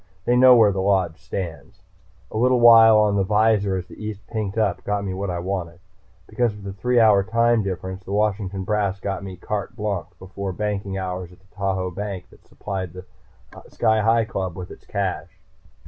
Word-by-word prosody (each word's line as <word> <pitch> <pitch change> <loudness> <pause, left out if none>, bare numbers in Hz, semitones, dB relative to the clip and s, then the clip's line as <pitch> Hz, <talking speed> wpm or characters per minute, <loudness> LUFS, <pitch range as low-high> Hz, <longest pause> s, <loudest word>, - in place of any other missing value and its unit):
They 120 - +3
know 125 0 +7
where 110 -3 +5
the 95 -1 -2
Lodge 95 -4 +1
stands. 90 -5 -6 0.5
A - - -4
little 125 +2 +3
while 115 -2 +8
on 105 -1 +3
the 100 - +2
visor 105 -1 +2
as 90 -1 -4
the - - -12
east 105 -2 -6
pinked 105 -1 -4
up 105 -5 0
got 100 0 -2
me 95 - -3
what 95 +1 -4
I 90 - -2
wanted. 85 -2 -4 0.5
Because 115 0 -1
of 105 -1 -12
the 100 -1 -6
three 125 +5 +1
hour 105 -3 +5
time 115 +2 +2
difference, 95 -1 -5
the 95 - -9
Washington 100 -2 -1
brass 100 -1 -1
got 95 0 -4
me 95 -1 -7
carte 100 +2 -4
blanche 100 -5 -3
before 95 +1 -6
banking 100 -1 -3
hours 90 -1 -5
at 90 - -17
the 95 +1 -30
Tahoe 95 -2 -2
bank 100 -1 -6
that - - -21
supplied 95 -4 -6
the 90 0 -10 0.6
Sky 110 0 +1
Hi 115 +1 +3
Club 95 -6 -4
with 90 -1 -8
its - - -14
cash. - - -4
100 Hz, 195 wpm, -22 LUFS, 95-110 Hz, 0.6 s, while